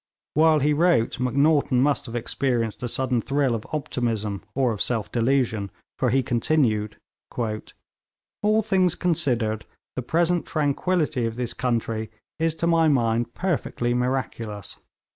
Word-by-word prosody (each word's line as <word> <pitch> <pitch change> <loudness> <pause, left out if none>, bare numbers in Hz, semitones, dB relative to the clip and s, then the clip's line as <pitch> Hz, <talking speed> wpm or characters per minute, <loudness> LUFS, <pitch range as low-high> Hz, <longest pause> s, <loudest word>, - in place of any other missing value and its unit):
While 160 +1 +5
he 150 +2 +3
wrote, 165 -8 +2
Macnaghten 140 +1 +3
must 140 +1 +1
have 115 - -7
experienced 120 -1 -1
a 125 - -2
sudden 125 0 0
thrill 140 0 +1
of 110 -2 -4
optimism 115 -9 -2
or 130 -3 +2
of 105 - -4
self 115 -4 -1
delusion, 115 -4 +1 0.3
for 125 - +2
he 130 +2 +2
continued: 115 -4 +1 0.4
'All 125 - -3
things 185 -4 +2
considered, 120 - 0 0.3
the 130 - -2
present 170 +6 +1
tranquillity 150 -3 0
of 115 - -5
this 120 -1 -3
country 115 -3 -1 0.3
is 165 0 +1
to 170 - -2
my 165 -1 +4
mind 120 -4 +1
perfectly 145 -9 -1
miraculous. 120 -5 -3
125 Hz, 135 wpm, -24 LUFS, 115-155 Hz, 0.4 s, While